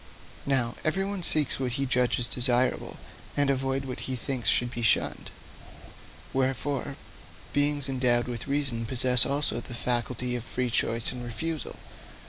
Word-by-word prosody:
Now, 125 -4 +1
everyone 195 +4 -1
seeks 155 -6 +1
what 125 -2 -2
he 135 +2 -1
judges 125 -2 +2
desirable, 125 +1 +2 0.4
and 145 -1 +3
avoids 135 0 -1
what 130 -1 -5
he 130 - -1
thinks 125 0 -1
should 120 0 +3
be 120 - -5
shunned. 115 - +1 1.0
Wherefore, 135 +1 -1 0.6
beings 145 -1 +1
endowed 125 -2 +2
with 120 -1 -5
reason 135 -5 -1
possess 125 0 +5
also 140 +2 0
the 120 - -8
faculty 125 0 -1
of 120 - -4
free 125 0 -3
choice 115 0 0
and 125 -1 -7
refusal. 155 +7 -4
130 Hz, 140 wpm, -27 LUFS, 120-140 Hz, 1.0 s, possess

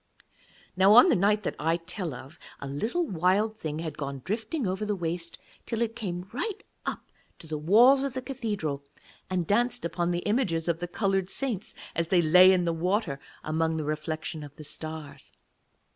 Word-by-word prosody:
Now, 190 +2 +6
on 245 - +10
the 365 - +4
night 210 +3 +2
that - - -2
I 165 +2 +1
tell 175 0 -5
of, 130 +5 -12 0.2
a 140 - -6
little 220 - -1
Wild 200 - +1
Thing 155 -1 -3
had 160 -1 -5
gone 140 -2 -5
drifting 225 - -2
over 190 +2 -2
the 210 -1 0
waste, 170 -1 -3 0.3
till 230 - -2
it 225 0 -3
came 180 -5 -4
right 430 -3 -3 0.2
up - - -5 0.3
to - - -12
the 155 -1 -4
walls 240 - +6
of 275 -2 -2
the 260 - -3
cathedral 205 - -3 0.5
and 185 -2 0
danced 240 +3 +1
upon 170 +1 -1
the 175 0 -2
images 195 -8 0
of 165 -1 0
the 175 - -3
coloured 195 0 0
saints 235 -6 -3 0.2
as 170 -1 0
they 180 +1 +3
lay 180 +4 +8
in 180 -2 +2
the 170 - +1
water 175 -3 0 0.2
among 160 +1 0
the 155 - -2
reflection 155 +1 -3
of 145 0 -11
the 155 - -10
stars. 150 -2 -7
180 Hz, 190 wpm, -28 LUFS, 160-215 Hz, 0.5 s, on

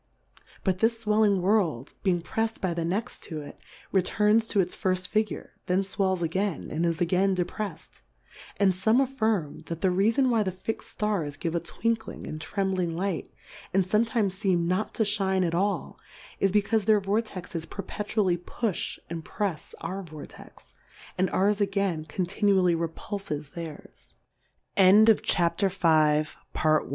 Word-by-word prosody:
But 185 -2 +1
this 225 +1 +1
fwelling 210 -2 +3
World 175 - +1
being 175 -4 +1
prefs'd 225 +4 -2
by 185 -3 -1
the 170 0 -2
next 200 +9 -2
to 155 -4 -5
it, 145 - -11 0.3
returns 210 +4 +3
to 205 - +1
its 180 -1 +1
firft 185 -1 0
Figure; 215 -1 -2
then 185 +2 +2
fwells 190 -2 0
again, 185 +3 -2
and 165 +3 0
is 165 -1 -1
again 185 +3 +2
deprefs'd; 180 - -5 0.6
and 195 -1 +4
fome 220 +7 +3
affirm, 220 - 0
that 165 -1 -5
the 190 - +3
Reafon 220 +8 +3
why 230 -2 +3
the 190 -3 0
fixM 185 +5 -4
Stars 180 -9 -2
give 165 +1 -2
a 170 - +1
twinkling 225 +6 -3
and 155 0 -6
trembling 185 -2 -1
Light, 185 0 -2 0.4
and 195 -1 +4
fometimes 215 0 +1
feem 190 -5 +2
not 185 +5 -1
to 220 - +2
fliine 195 -3 +1
at 165 - -1
all, 195 +4 -1 0.4
is 195 - +3
becaufe 210 +1 +2
their 215 0 +5
Vortexes 195 -5 -3
perpetually 200 -1 -1
pufh 195 +3 -3
and 165 -1 -5
prefs 190 -5 -3
our 185 +4 -4
Vortex, 155 -5 -12 0.4
and 185 +1 +1
ours 205 +2 +2
again 195 -5 0
continually 185 +2 +2
repulf 170 +5 -4
190 Hz, 140 wpm, -27 LUFS, 175-210 Hz, 0.6 s, their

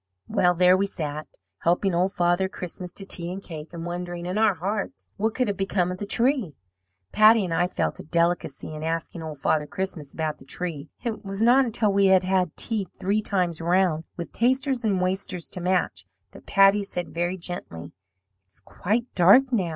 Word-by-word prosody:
"Well, 180 0 +2
there 180 +1 +5
we 195 +1 +1
sat, 155 -4 -5 0.3
helping 180 +3 +1
Old 180 +3 +1
Father 175 +1 +1
Christmas 180 -1 -7
to 195 - -1
tea 175 -2 -1
and 190 - -5
cake, 160 -5 -9
and 170 -1 -7
wondering 175 0 -5
in 180 +1 -3
our 215 -2 +3
hearts 200 +8 -4
what 220 +2 -1
could 255 -2 +1
have 200 -2 -2
become 190 -2 0
of 180 - -6
the 205 - -5
tree. 235 - +1 0.6
"Patty 215 0 +6
and 170 - -3
I 175 +2 +2
felt - - -2
a - - -7
delicacy 170 0 -1
in 155 - -7
asking 165 +1 -3
Old 155 -2 -6
Father 150 +2 0
Christmas 185 -7 -5
about 155 -1 -3
the - - -14
tree. 155 -1 -5
It 230 -3 -4
was 195 0 -5
not 255 +3 +5
until 220 -3 +1
we 200 0 +4
had 190 -1 +5
had 185 -3 0
tea 215 -5 0
three 200 +3 +1
times 180 -6 0
round, 175 -2 +2
with 170 -2 -6
tasters 260 +1 +1
and 200 -4 +1
wasters 185 -2 -2
to 180 - -7
match, 175 - -1 0.2
that - - -15
Patty 195 +1 +5
said 180 -3 -4
very 175 +2 -1
gently: 175 - -7 0.6
'It's 95 - -17
quite 205 - -2
dark 200 +10 +6
now.' 190 -7 +1
185 Hz, 195 wpm, -25 LUFS, 170-200 Hz, 0.6 s, Patty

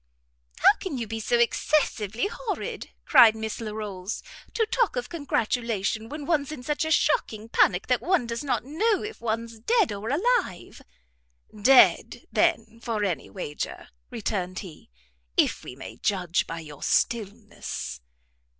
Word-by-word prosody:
"How - - +7
can 355 -8 -4
you 235 - -3
be 225 +1 -5
so 240 +2 +1
excessive 235 -3 +1
horrid," 460 - -3 0.2
cried 225 -2 +7
Miss 220 +1 -4
Larolles, 210 -3 -5 0.3
"to 450 - +2
talk 445 +1 +1
of 245 -1 -3
congratulation, 230 - -1
when 295 -1 -6
one's 295 -3 0
in 265 -5 -7
such 295 +4 -1
a - - -2
shocking 225 - +1
panic 180 -4 +3
that 250 -1 +1
one 355 -7 +2
does 230 +3 -4
not 245 -5 -1
know 390 - +1
if 425 +1 -7
one's 230 0 -3
dead 435 - +2
or 205 +2 -4
alive!" 345 - 0 0.7
"Dead, 250 +5 +5
then, 230 - +1
for 225 -3 -2
any 175 -8 -2
wager," 150 -6 -6 0.2
returned 185 -4 -3
he, 160 - -13 0.5
"if - - +2
we 125 - -8
may 135 - -9
judge 180 -4 0
by 165 0 -5
your 150 -3 -11
stillness." 210 - -2
230 Hz, 145 wpm, -26 LUFS, 205-295 Hz, 0.7 s, How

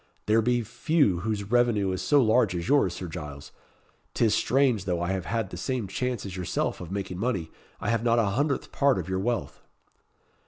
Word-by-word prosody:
There 110 +2 +4
be 120 +1 +1
few 115 - +1
whose 105 +1 -3
revenue 120 -6 +3
is 95 - -3
so 145 -2 +4
large 110 -4 +3
as 85 -1 -3
yours, 140 -12 +3
Sir 95 - -6
Giles. 75 -4 -8 0.6
'Tis 110 -3 +3
strange, 125 -7 +2
though 90 -2 -1
I 85 +2 -1
have 95 -2 -2
had 110 +1 -2
the 90 - -6
same 125 +2 -2
chance 125 +3 -3
as 95 -2 -6
yourself 90 0 -2
of 90 0 -8
making 95 -2 -4
money, 100 -8 -2 0.3
I - - -2
have 115 -1 0
not 120 -1 +3
a 115 - +3
hundredth 140 +4 -1
part 140 -2 +3
of 90 -2 -4
your 95 0 -1
wealth." 120 +4 -2
105 Hz, 200 wpm, -27 LUFS, 95-120 Hz, 0.6 s, There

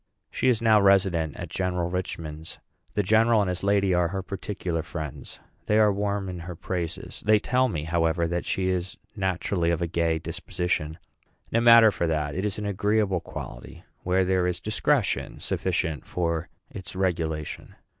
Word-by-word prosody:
She - - 0
is 115 -2 +1
now 110 -2 +5
resident 95 -5 +3
at - - -6
General 90 -2 -1
Richman's. 85 -3 -5 0.4
The 105 - +2
general 110 +3 +4
and 100 - +1
his 90 0 -2
lady 100 -1 +3
are 90 -1 +3
her 95 +2 -4
particular 95 -4 -3
friends; 80 -3 -7 0.3
they 105 - +3
are 105 -2 +5
warm 100 -1 -1
in 90 -1 -5
her 85 +1 -7
praises. 85 0 -5
They 110 0 +5
tell 125 +4 +2
me, 80 -10 -3
however, 85 +1 +1
that 85 +1 -2
she 95 -1 -1
is 95 0 -2 0.2
naturally 95 -3 0
of 85 -2 +1
a 85 - 0
gay 85 -1 0
disposition. 80 -1 -3 0.5
No 115 - +2
matter 115 -2 +8
for 90 -3 -1
that; 75 -2 -1
it 95 +3 -1
is 100 - -3
an 105 - -4
agreeable 100 -1 +1
quality, - - -9 0.2
where 95 +1 +2
there 90 -1 +2
is 90 -1 -1
discretion 110 +1 0
sufficient 75 -5 -1
for 85 -2 -2 0.2
its 95 0 -8
regulation. 80 -5 -2
90 Hz, 170 wpm, -26 LUFS, 85-100 Hz, 0.5 s, matter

